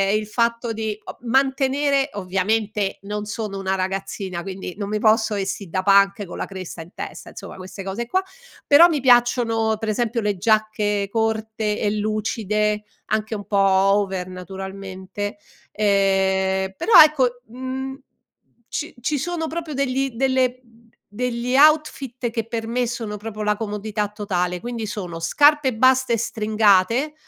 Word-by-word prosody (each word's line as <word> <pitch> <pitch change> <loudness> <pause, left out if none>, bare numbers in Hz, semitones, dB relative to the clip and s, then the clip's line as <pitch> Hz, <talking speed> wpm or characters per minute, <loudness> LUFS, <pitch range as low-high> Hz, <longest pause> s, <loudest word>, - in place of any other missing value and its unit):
il 215 0 -1
fatto 235 +1 0
di 220 -1 -3
o - - -9
mantenere, 270 +2 +1
ovviamente 200 +2 -1
non 210 +1 -4
sono 210 -2 -4
una 190 0 -1
ragazzina, 190 -1 -3
quindi 190 -1 -6
non 200 -1 -4
mi 215 0 -1
posso 220 0 +3
vestì 195 -1 -3
da 185 +2 -2
punk 200 +1 +4
con - - -9
la - - -3
cresta 185 -3 -8
in 170 +3 -13
testa, - - -8
insomma, - - -10
queste 190 +1 -8
cose 205 +5 -4
qua; 375 +7 +1 0.4
però 315 +4 +8
mi 310 -4 0
piacciono, 240 -3 +3
pre 220 -1 -2
esempio 230 +1 -1
le 205 -2 -1
giacche 210 -1 +1
corte 220 -1 -1
e 205 - 0
lucide, 210 0 -1 0.2
anche 215 +1 -1
un 205 - -7
po' 200 - -1
over 195 -1 +2
naturalmente, 190 +2 -6 0.3
ehm, 190 -2 +1
però 455 - 0
ecco, 255 -5 +1
mhmm, 260 +2 -5 0.7
ci 305 - -4
ci 290 +4 0
sono 330 +1 -2
proprio 325 -2 -5
degli 270 0 0
delle 255 0 +1 0.5
degli 250 +2 -2
outfit 275 -5 +3
che 230 -1 -3
per 230 -1 -3
me 245 +1 0
sono 225 -3 -4
proprio 215 0 -6
la 210 0 +1
comodità 210 -1 -3
totale, 180 -4 -2
quindi 235 -1 -5
sono: 180 -5 -5
scarpe 290 - +4
basse 260 0 +3
stringate 220 +5 +2
215 Hz, 145 wpm, -22 LUFS, 195-245 Hz, 0.7 s, però